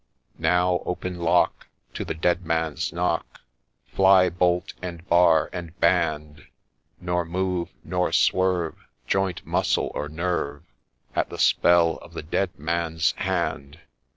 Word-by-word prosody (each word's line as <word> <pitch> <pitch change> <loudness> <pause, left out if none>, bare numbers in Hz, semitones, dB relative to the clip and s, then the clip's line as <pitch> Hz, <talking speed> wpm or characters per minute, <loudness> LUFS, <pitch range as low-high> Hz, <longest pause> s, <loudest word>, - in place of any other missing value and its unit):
' - - -36
Now 90 0 +2
open 90 0 -4
lock 85 - +1 0.3
To - - -4
the - - -4
Dead 85 +2 +1
Man's 80 -2 -1
knock! 85 0 -2 0.4
Fly 95 -1 +4
bolt, 90 0 0
and 90 -1 -7
bar, 85 -2 +4
and 85 -1 -7
band! 75 -4 0 0.3
— 65 0 -44
Nor 90 0 -1
move, 90 +1 -2
nor 90 -1 -1
swerve 90 -3 +1 0.3
Joint, 95 -2 -1
muscle, - - 0
or 75 0 -4
nerve, 80 -3 -3 0.5
At - - 0
the - - -8
spell 85 -1 +4
of - - -15
the - - -5
Dead 90 +3 -2
Man's 80 +1 0
hand 70 +1 -2
85 Hz, 135 wpm, -24 LUFS, 80-90 Hz, 0.5 s, Fly